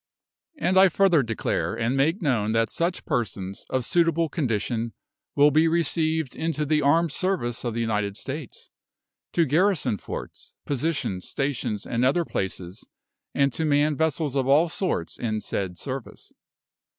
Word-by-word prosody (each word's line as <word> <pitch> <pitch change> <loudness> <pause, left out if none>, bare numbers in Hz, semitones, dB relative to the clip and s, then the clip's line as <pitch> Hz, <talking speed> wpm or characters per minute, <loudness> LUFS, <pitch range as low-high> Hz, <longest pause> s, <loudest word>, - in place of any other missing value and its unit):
And 190 -8 +3
I 190 0 +7
further 180 -3 +4
declare 115 -3 -2
and 115 +3 0
make 160 +8 +1
known 110 -7 +1
that 115 0 +1
such 170 +2 -2
persons, 95 -4 -3
of 130 -2 -1
suitable 165 0 +2
condition, 115 - -1 0.4
will 145 +1 +6
be 155 +3 +4
received 160 -3 0
into 160 -2 -1
the 150 +1 +2
armed 160 +3 +3
service 175 -12 -1
of 120 -3 -2
the 115 - -1
United 105 -3 -1
States, 140 +1 -7 0.6
to 170 - +3
garrison 150 - +2
forts, - - -8
positions, 140 - -2
stations, 130 -7 -2
and 115 +1 -1
other 145 +7 +2
places, 95 - -4 0.5
and 140 -2 +2
to 160 - -2
man 150 0 +2
vessels 155 -2 0
of 135 -2 +1
all 150 +5 +4
sorts 160 - -2
in 110 -2 -1
said 95 -4 -3
service. 135 +1 -7
140 Hz, 150 wpm, -25 LUFS, 115-160 Hz, 0.6 s, I